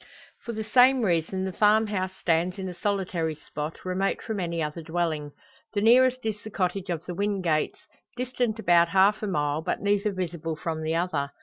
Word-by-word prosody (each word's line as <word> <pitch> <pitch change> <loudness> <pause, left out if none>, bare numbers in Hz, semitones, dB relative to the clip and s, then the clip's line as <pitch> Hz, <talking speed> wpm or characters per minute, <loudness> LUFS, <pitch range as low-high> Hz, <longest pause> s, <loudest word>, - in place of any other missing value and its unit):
For 235 - -6
the 220 0 -3
same 250 +3 +5
reason 185 0 0
the 190 - -4
farm 215 +3 +4
house 190 -3 -3
stands 170 +2 +1
in 190 -1 -4
a 180 - -5
solitary 180 -5 -1
spot, 150 +2 -7
remote 185 +2 0
from 220 -3 -4
any 170 -2 -2
other 150 +2 -4
dwelling. 160 -2 -2 0.4
The 205 - +1
nearest 255 +2 +4
is 215 -1 -2
the 215 - -8
cottage 190 -1 -2
of 170 -2 -3
the 180 - -5
Wingates 185 -5 -1 0.4
distant 245 -3 -1
about 175 -5 +4
half 195 +4 +3
a 210 - -2
mile, 150 -4 0
but - - -2
neither 205 +1 +1
visible 170 -4 -4
from 160 0 -4
the 160 +1 -1
other. 165 -5 -1
185 Hz, 190 wpm, -26 LUFS, 165-210 Hz, 0.4 s, same